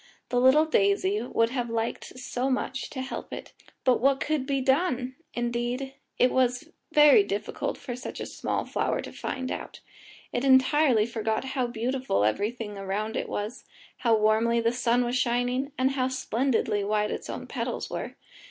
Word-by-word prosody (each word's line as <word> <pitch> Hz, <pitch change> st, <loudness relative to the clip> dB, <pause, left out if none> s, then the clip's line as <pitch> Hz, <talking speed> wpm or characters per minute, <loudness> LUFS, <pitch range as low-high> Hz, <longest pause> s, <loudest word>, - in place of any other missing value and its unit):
The 245 Hz, -, +2 dB
little 270 Hz, +5 st, +6 dB
daisy 200 Hz, -6 st, +2 dB
would 230 Hz, -1 st, +1 dB
have 245 Hz, -2 st, -2 dB
liked 230 Hz, +2 st, -3 dB
so 255 Hz, +1 st, -2 dB
much 265 Hz, 0 st, -2 dB
to 260 Hz, -2 st, -5 dB
help 265 Hz, -, -6 dB
it, -, -, -8 dB, 0.3 s
but 255 Hz, -2 st, +4 dB
what 270 Hz, +1 st, +3 dB
could 295 Hz, -4 st, -1 dB
be 275 Hz, -1 st, +1 dB
done? 265 Hz, -2 st, +1 dB, 0.2 s
Indeed, 240 Hz, +3 st, -2 dB, 0.2 s
that 250 Hz, -, +4 dB
was 255 Hz, +4 st, +1 dB, 0.2 s
very 295 Hz, -8 st, +7 dB
difficult 200 Hz, +1 st, -3 dB
for 250 Hz, -4 st, -6 dB
such 250 Hz, -, -7 dB
a -, -, -3 dB
small -, -, -3 dB
flower -, -, -1 dB
to -, -, -8 dB
find 260 Hz, 0 st, -4 dB
out. -, -, -6 dB, 0.5 s
It 245 Hz, -, -1 dB
entirely 260 Hz, -3 st, +5 dB
forgot 220 Hz, 0 st, -2 dB
how 255 Hz, -2 st, 0 dB
beautiful 240 Hz, -, -1 dB
everything 210 Hz, -, -2 dB
around 205 Hz, +3 st, -3 dB
it -, -, -2 dB
was, 210 Hz, +5 st, -4 dB, 0.3 s
how 230 Hz, -2 st, +3 dB
warmly 220 Hz, +2 st, +3 dB
the 230 Hz, 0 st, +2 dB
sun 245 Hz, 0 st, +1 dB
was 240 Hz, +1 st, -1 dB
shining, 245 Hz, +3 st, 0 dB
and 260 Hz, +1 st, +2 dB
how 260 Hz, -2 st, 0 dB
splendidly 260 Hz, -4 st, 0 dB
white 210 Hz, +1 st, 0 dB
its -, -, -5 dB
own -, -, -5 dB
petals -, -, -3 dB
were. -, -, -5 dB
245 Hz, 170 wpm, -27 LUFS, 225-265 Hz, 0.5 s, very